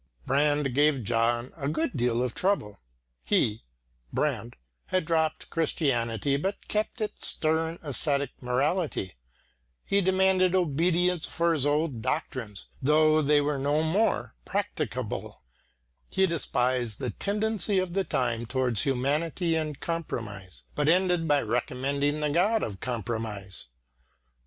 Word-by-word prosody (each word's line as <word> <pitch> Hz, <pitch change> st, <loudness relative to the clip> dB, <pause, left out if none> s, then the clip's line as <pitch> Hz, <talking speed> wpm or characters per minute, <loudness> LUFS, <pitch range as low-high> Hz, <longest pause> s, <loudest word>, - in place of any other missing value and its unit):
Brand 145 Hz, 0 st, +2 dB
gave 145 Hz, -2 st, +3 dB
John 120 Hz, +2 st, 0 dB
a 140 Hz, -3 st, -3 dB
good 155 Hz, +1 st, -1 dB
deal 120 Hz, -1 st, +1 dB
of 125 Hz, -, -2 dB
trouble. 185 Hz, -, 0 dB, 0.4 s
He 105 Hz, -, +1 dB, 0.5 s
(Brand) -, -, -1 dB, 0.3 s
had 185 Hz, -3 st, 0 dB
dropped 160 Hz, -1 st, 0 dB
Christianity 135 Hz, -, 0 dB
but 195 Hz, +8 st, -3 dB
kept 215 Hz, +3 st, -2 dB
its 215 Hz, -, 0 dB
stern 160 Hz, +1 st, +1 dB
ascetic 140 Hz, -1 st, +1 dB
morality; 135 Hz, -, -1 dB, 0.7 s
he 200 Hz, -, +2 dB
demanded 190 Hz, -1 st, +3 dB
obedience 175 Hz, +1 st, +2 dB
for 170 Hz, 0 st, +1 dB
his 145 Hz, -3 st, +2 dB
old 145 Hz, -5 st, 0 dB
doctrines 110 Hz, -2 st, -3 dB, 0.2 s
though 155 Hz, +2 st, +4 dB
they 145 Hz, 0 st, +4 dB
were 145 Hz, -1 st, -1 dB
no 145 Hz, +3 st, +1 dB
more 195 Hz, +8 st, +1 dB
practicable; -, -, -3 dB, 0.7 s
he 190 Hz, 0 st, +3 dB
despised 125 Hz, -, 0 dB
the 125 Hz, -4 st, -3 dB
tendency 210 Hz, -, -1 dB
of 185 Hz, -2 st, 0 dB
the 195 Hz, +1 st, +1 dB
time 120 Hz, -7 st, -1 dB
towards 125 Hz, -5 st, +1 dB
humanity 150 Hz, -, 0 dB
and 155 Hz, -3 st, -3 dB
compromise, 100 Hz, -, -5 dB
but 145 Hz, +1 st, +1 dB
ended 180 Hz, -1 st, +3 dB
by 145 Hz, -2 st, +3 dB
recommending 135 Hz, +6 st, -1 dB
the 150 Hz, -1 st, 0 dB
God 205 Hz, +8 st, +2 dB
of 100 Hz, -4 st, -4 dB
compromise. 110 Hz, -, -4 dB
145 Hz, 125 wpm, -27 LUFS, 125-170 Hz, 0.7 s, though